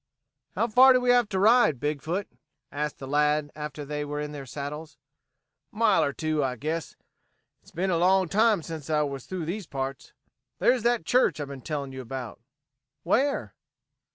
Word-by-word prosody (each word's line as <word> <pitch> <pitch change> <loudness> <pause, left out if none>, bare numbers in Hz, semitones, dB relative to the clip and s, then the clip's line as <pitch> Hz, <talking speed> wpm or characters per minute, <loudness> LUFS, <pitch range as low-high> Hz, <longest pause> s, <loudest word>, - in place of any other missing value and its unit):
"How 230 - +1
far 255 +4 +7
do 255 - +4
we 250 0 +3
have 245 -3 +3
to 195 - -2
ride, 205 - +4
Big 145 0 -2
foot?" 185 +5 -3 0.4
asked 150 0 -3
the 135 - -8
lad 150 +1 +1
after 150 -1 -6
they 150 +1 -3
were 145 0 -4
in 150 0 -4
their 140 -2 -8
saddles. 150 +3 -7 0.7
"Mile 215 -2 +3
or 140 - 0
two, 155 0 -1
I 130 -2 -1
guess. 155 +6 -4 0.7
It's - - -20
been 185 +3 -2
a 170 - +1
long 185 +1 +3
time 210 -1 +3
since 160 -2 -7
I 150 -1 +2
was 140 -3 -5
through 185 -3 -4
these 185 +2 -4
parts. 135 -1 -5 0.5
There's 250 -1 +3
that 240 0 +1
church 250 -9 +2
I've 145 -1 -4
been 140 -2 -8
telling 140 -1 -4
you 130 0 -7
about." 125 -2 -7 0.6
"Where?" 275 +11 0
155 Hz, 180 wpm, -26 LUFS, 145-200 Hz, 0.7 s, far